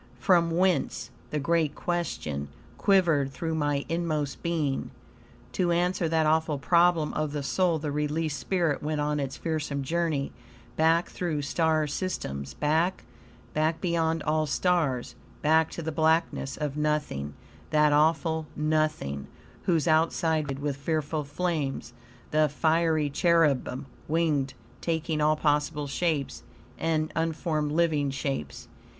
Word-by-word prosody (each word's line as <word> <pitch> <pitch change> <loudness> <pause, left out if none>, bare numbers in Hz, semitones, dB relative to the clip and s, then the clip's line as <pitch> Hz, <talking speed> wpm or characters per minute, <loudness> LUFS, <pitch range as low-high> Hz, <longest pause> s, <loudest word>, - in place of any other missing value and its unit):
"From 170 +6 +3
whence," 175 -2 0 0.2
the 150 - -2
great 160 0 +1
question, 80 - -3 0.3
quivered 165 -9 +3
through 160 +3 -3
my 145 -2 0
inmost 155 -4 -2
being. 155 -5 -1 0.6
To 175 -2 +1
answer 175 -1 +1
that 160 -1 +2
awful 155 -1 +2
problem 170 +1 +3
of 155 -1 -2
the 145 -1 -2
soul 175 +3 +1
the 150 -1 -3
released 150 +1 -1
spirit 170 -6 0
went 150 0 -2
on 150 0 0
its 135 -2 -3
fearsome 150 -4 -2
journey, 160 -2 -1 0.4
back 165 +3 +3
through 160 -5 -2
star 160 +1 +1
systems; 70 - -4
back, 160 - +1 0.5
back 155 +1 +1
beyond 165 -3 0
all 155 0 +1
stars, 145 -5 0 0.3
back 160 +1 +4
to 170 - -6
the 160 - -2
blackness 160 -3 +1
of 150 -2 -3
nothing 150 - -1 0.3
that 150 -1 +4
awful 160 +1 +2
nothing, 155 - 0 0.4
whose 170 -3 +2
outside 160 +1 +2
ring 160 -1 +2
vibrated 140 - -9
with 145 -2 -1
fearful 155 +1 -1
flames; 145 -5 -2 0.4
the 155 0 +3
fiery 155 0 +1
cherubim, 150 -5 +2 0.2
winged, 150 -4 +1 0.3
taking 160 -2 -1
all 155 +1 +4
possible 150 0 0
shapes, 145 0 -1 0.4
and 155 -1 0
unformed 160 -2 -1
living 155 -3 +2
shapes. 135 - -4
155 Hz, 130 wpm, -27 LUFS, 145-165 Hz, 0.6 s, back